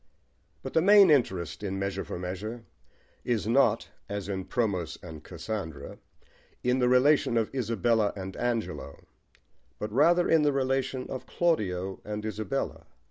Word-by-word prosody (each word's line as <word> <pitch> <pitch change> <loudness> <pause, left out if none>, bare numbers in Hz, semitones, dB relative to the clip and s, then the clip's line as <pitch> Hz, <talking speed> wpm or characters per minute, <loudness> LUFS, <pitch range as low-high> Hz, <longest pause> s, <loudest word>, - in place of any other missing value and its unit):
But - - -6
the 160 - +4
main 200 -1 +7
interest 90 - +1
in 95 -2 -3
Measure 100 0 -2
for - - -6
Measure 100 +6 -5 0.6
is 110 -5 -1
not, 115 -2 +3 0.2
as 100 -1 -4
in 95 -2 -3
Promos 95 -10 -1
and 80 -3 -9
Cassandra, 85 -1 -6 0.6
in 125 +1 +2
the 125 -1 +3
relation 130 -1 +4
of 115 +1 0
Isabella 115 -3 +1
and 95 -1 -6
Angelo, 115 -11 -3 0.7
but 105 - -5
rather 170 +7 +4
in 165 -1 +4
the 150 -1 +3
relation 130 -1 -1
of 130 - -6
Claudio 95 - 0
and 105 0 -5
Isabella. 110 -2 -3
110 Hz, 140 wpm, -28 LUFS, 95-130 Hz, 0.7 s, main